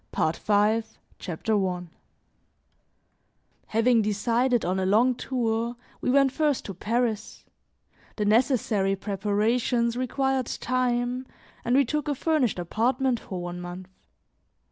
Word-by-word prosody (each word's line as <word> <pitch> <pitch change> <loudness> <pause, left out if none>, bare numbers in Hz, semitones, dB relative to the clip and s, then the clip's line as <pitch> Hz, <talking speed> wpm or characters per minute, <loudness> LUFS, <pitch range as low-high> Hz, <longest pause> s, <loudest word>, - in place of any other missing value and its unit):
PART 160 - 0
V 210 +2 +2 0.4
CHAPTER 200 +4 -1
I 180 -1 -3 1.8
HAVING 230 +1 +3
decided 230 +4 +1
on 185 +2 0
a 190 - 0
long 230 +6 +4
tour, 235 -2 -2 0.3
we - - -1
went 275 +1 +4
first 295 -1 0
to 195 - -5
Paris; 225 +3 -2 0.7
the 210 - -1
necessary 215 -4 +2
preparations 215 +4 0
required 260 0 0
time 250 0 -1 0.4
and 240 +2 +1
we 275 0 +5
took 300 +4 -2
a 290 - 0
furnished 290 - +1
apartment 240 +8 0
for 180 -2 -6
one 175 0 -5
month. 180 +1 -8
230 Hz, 120 wpm, -26 LUFS, 205-255 Hz, 1.8 s, we